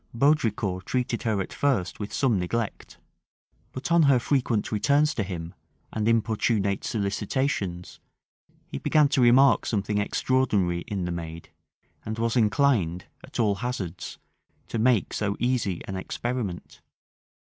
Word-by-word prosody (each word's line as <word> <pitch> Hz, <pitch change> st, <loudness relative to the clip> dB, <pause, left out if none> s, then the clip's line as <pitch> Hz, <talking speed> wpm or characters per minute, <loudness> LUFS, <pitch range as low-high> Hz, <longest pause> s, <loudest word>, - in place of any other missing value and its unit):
Baudricourt 115 Hz, -, +1 dB
treated 125 Hz, -2 st, -1 dB
her 110 Hz, -3 st, 0 dB
at -, -, -6 dB
first 125 Hz, -11 st, 0 dB
with 105 Hz, -1 st, -5 dB
some 120 Hz, -8 st, +1 dB
neglect; 110 Hz, +5 st, -3 dB, 0.7 s
but 130 Hz, +6 st, -5 dB
on 170 Hz, 0 st, +5 dB
her 140 Hz, -4 st, +5 dB
frequent 120 Hz, -4 st, 0 dB
returns 145 Hz, +8 st, +2 dB
to 115 Hz, -, -2 dB
him, 85 Hz, -4 st, -5 dB, 0.4 s
and 110 Hz, 0 st, -1 dB
importunate 110 Hz, -3 st, +1 dB
solicitations, 100 Hz, -3 st, -2 dB, 0.7 s
he 70 Hz, -, -6 dB
began 150 Hz, -2 st, +3 dB
to 140 Hz, -2 st, +2 dB
remark 130 Hz, +3 st, +6 dB
something 105 Hz, -1 st, 0 dB
extraordinary 105 Hz, -6 st, +1 dB
in 95 Hz, -4 st, -3 dB
the 90 Hz, -, -2 dB
maid, 85 Hz, -1 st, -6 dB, 0.5 s
and 110 Hz, +1 st, -5 dB
was 115 Hz, +1 st, 0 dB
inclined, 110 Hz, -, +2 dB, 0.2 s
at -, -, -8 dB
all 105 Hz, -3 st, +3 dB
hazards, 95 Hz, -8 st, -4 dB, 0.5 s
to 115 Hz, -, -2 dB
make 115 Hz, -3 st, +2 dB
so 100 Hz, -1 st, -1 dB
easy 120 Hz, -8 st, 0 dB
an 95 Hz, -, -5 dB
experiment. 105 Hz, 0 st, -4 dB
110 Hz, 135 wpm, -26 LUFS, 95-125 Hz, 0.7 s, remark